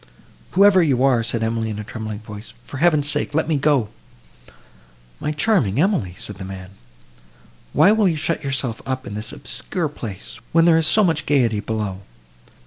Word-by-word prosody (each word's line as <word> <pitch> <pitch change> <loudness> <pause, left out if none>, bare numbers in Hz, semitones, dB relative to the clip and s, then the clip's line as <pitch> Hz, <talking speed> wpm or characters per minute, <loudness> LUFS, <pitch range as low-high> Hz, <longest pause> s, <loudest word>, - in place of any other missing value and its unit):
"Whoever 195 -1 +6
you 135 -6 +2
are," 130 -4 +3
said 115 0 -1
Emily, 115 0 -1
in 105 - -4
a 105 - -5
trembling 110 0 -6
voice, 105 0 -10
"for 140 - -8
heaven's 155 -2 +3
sake 145 0 0
let 160 - +1
me 160 - +1
go!" 140 -6 +2 1.3
"My 150 - -2
charming 150 - +1
Emily," 155 - +1
said 105 - -5
the 100 - -7
man, 95 -1 -8 1.0
"why 200 - +5
will 215 -2 +3
you 165 -3 0
shut 165 0 -1
yourself 135 -4 -3
up 130 0 -4
in 100 - -7
this 105 +2 -5
obscure 150 +7 -4
place, 115 -4 -8
when 165 0 +5
there 165 -1 +5
is 160 - +1
so 215 - +4
much 160 -4 0
gaiety 120 -7 +2
below? 105 -3 -4
130 Hz, 180 wpm, -21 LUFS, 110-160 Hz, 1.3 s, Whoever